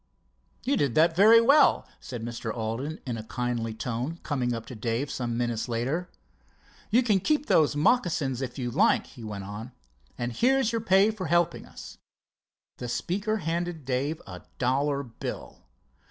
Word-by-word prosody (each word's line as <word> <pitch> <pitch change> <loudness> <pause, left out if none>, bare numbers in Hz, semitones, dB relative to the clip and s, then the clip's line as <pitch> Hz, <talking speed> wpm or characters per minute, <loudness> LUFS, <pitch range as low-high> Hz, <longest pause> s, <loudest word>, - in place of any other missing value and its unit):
"You 275 +2 +1
did 135 -5 0
that 165 +1 +4
very 220 +5 +8
well," 280 +6 +5
said 120 -3 -7
Mr. 115 -1 -4
Alden 115 +8 -4
in 120 -3 -3
a 110 - -6
kindly 120 -1 -3
tone, 125 +8 -3
coming 130 -5 -1
up 115 -1 -4
to 125 - -9
Dave 115 +5 -2
some 120 -2 -3
minutes 120 0 -1
later. 135 +10 -1 0.8
"You 245 +4 +4
can 210 -5 +3
keep 300 - +1
those 150 - +3
moccasins 150 - +1
if 130 0 -5
you 120 -2 -3
like," - - +3
he 120 - -13
went 105 -2 -5
on. 105 +5 -8 0.4
"And 120 0 -3
here's 260 - +2
your 230 -1 -1
pay 200 0 +4
for 195 -5 -5
helping 170 +2 +1
us." - - -11 0.8
The 125 - -5
speaker 190 - -1
handed 170 -2 -2
Dave 135 +5 -1
a 90 -2 -9 0.2
dollar 140 +3 +1
bill. 115 -4 -8
135 Hz, 165 wpm, -27 LUFS, 120-175 Hz, 0.8 s, very